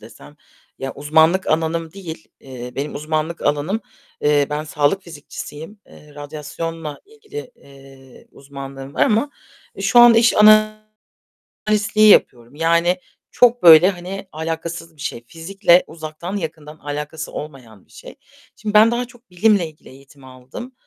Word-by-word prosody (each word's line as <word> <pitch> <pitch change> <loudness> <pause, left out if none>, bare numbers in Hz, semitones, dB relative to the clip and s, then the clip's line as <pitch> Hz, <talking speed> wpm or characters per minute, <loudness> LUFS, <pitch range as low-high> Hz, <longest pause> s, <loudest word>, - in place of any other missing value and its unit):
desem 115 +6 -15 0.4
ya 135 0 -5
uzmanlık 160 +5 +2
alanım 160 +1 -1
değil. 170 -5 -9
Eee, 125 -2 -9
benim 140 +4 -4
uzmanlık 155 +2 -3
alanım 155 +10 -1 0.4
eee, 145 -1 +2
ben 150 +1 -3
sağlık 150 +5 0
fizikçisiyim. 160 +3 -10
Eee, 150 -1 -18
radyasyonla 150 +1 -7
ilgili, 440 +2 -10
eee, 135 -1 -18
uzmanlığım 135 0 -10
var - - +1
ama 225 +7 +1 0.5
şu 245 - +3
an 240 -1 +8
iş 230 0 +4 1.3
analistliği 215 0 +3
yapıyorum. 120 - +3
Yani 170 +3 +2 0.4
çok 245 0 +3
böyle 170 +2 +8
hani 190 +1 -8
alâkasız 165 +1 -6
bir 145 - -16
şey. 120 -5 -5
Fizikle 175 - +2
uzaktan 160 +4 -7
yakından 155 -4 -7
alâkası 150 +2 -6
olmayan 125 -9 -10
bir - - -33
şey. - - -12 0.4
Şimdi 215 -1 -5
ben 215 +2 +7
daha 240 +1 -1
çok 245 -1 -21
bilimle 190 0 +2
ilgili 155 -1 -18
eğitim 135 +1 -18
aldım, 130 - -11
160 Hz, 135 wpm, -19 LUFS, 145-195 Hz, 1.3 s, an